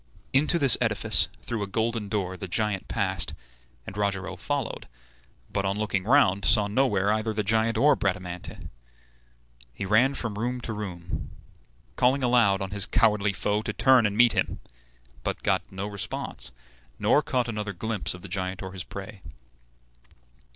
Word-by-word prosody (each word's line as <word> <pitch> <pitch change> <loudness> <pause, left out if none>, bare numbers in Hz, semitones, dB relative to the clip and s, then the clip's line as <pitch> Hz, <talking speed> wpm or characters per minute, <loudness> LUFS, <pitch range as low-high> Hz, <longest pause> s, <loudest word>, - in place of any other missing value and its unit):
Into 150 +5 +3
this 135 -8 +5
edifice, - - +3 0.2
through 115 -3 -3
a 100 - -2
golden 110 0 -1
door, 95 -3 -2
the 95 - -6
giant 105 +1 -1
passed, - - -2 0.5
and 95 - -8
Rogero 95 -2 -2
followed; 140 +6 -3 0.7
but, 100 - 0
on 100 +1 -1
looking 100 -3 -1
round, 110 -6 +4
saw 105 +1 +5
nowhere 105 -3 +2
either 110 0 -1
the 105 - 0
giant 110 +2 +1
or 145 +6 +5
Bradamante. 90 -2 -4 1.0
He 100 - -5
ran 120 +8 +3
from 105 -3 -3
room 125 +2 -2
to 115 - -4
room, 90 -5 -5 0.7
calling 130 +2 +3
aloud 115 -6 +3
on 95 - -6
his 100 -1 0
cowardly 105 -3 +3
foe 105 +2 0
to - - -4
turn 130 -4 +5
and 100 0 -4
meet 120 0 +6
him; - - -1 0.6
but - - -4
got - - 0
no 95 +1 -4
response, 100 -10 -4 0.5
nor - - +3
caught 125 -2 -1
another 105 -3 -3
glimpse 105 0 -2
of 90 - -13
the - - -7
giant 95 +1 -3
or 95 - -6
his 95 -1 -5
prey. 100 0 -9
105 Hz, 160 wpm, -26 LUFS, 95-115 Hz, 1.0 s, meet